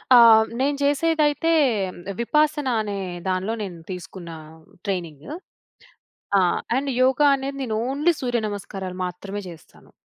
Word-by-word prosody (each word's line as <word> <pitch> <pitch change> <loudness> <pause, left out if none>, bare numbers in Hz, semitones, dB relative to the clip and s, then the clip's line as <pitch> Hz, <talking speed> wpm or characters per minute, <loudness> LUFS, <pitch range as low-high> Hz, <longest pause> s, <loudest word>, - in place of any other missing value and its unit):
ఆహ్, 225 -2 +8
నేను 280 +2 +1
చేసేదైతే 305 +2 +2 0.7
విపాసన 300 +3 +1
అనే 205 -2 -4 0.3
దానిలో 190 +4 -1
నేను 185 -4 -7
తీసుకున్న 180 -1 -8 0.6
ట్రైనింగ్. 170 -7 -4 1.1
ఆ! - - +5 0.4
అండ్ 275 +1 -1
యోగ 260 +1 +3 0.2
అనేది 275 0 -4
నేను 225 -4 -2
ఓన్లీ 295 +6 +2
సూర్య 245 -2 0
నమస్కారాలు 195 -2 -6
మాత్రమే 195 +3 -6
చేస్తాను. 165 -3 -15
225 Hz, 115 wpm, -23 LUFS, 190-280 Hz, 1.1 s, ఆహ్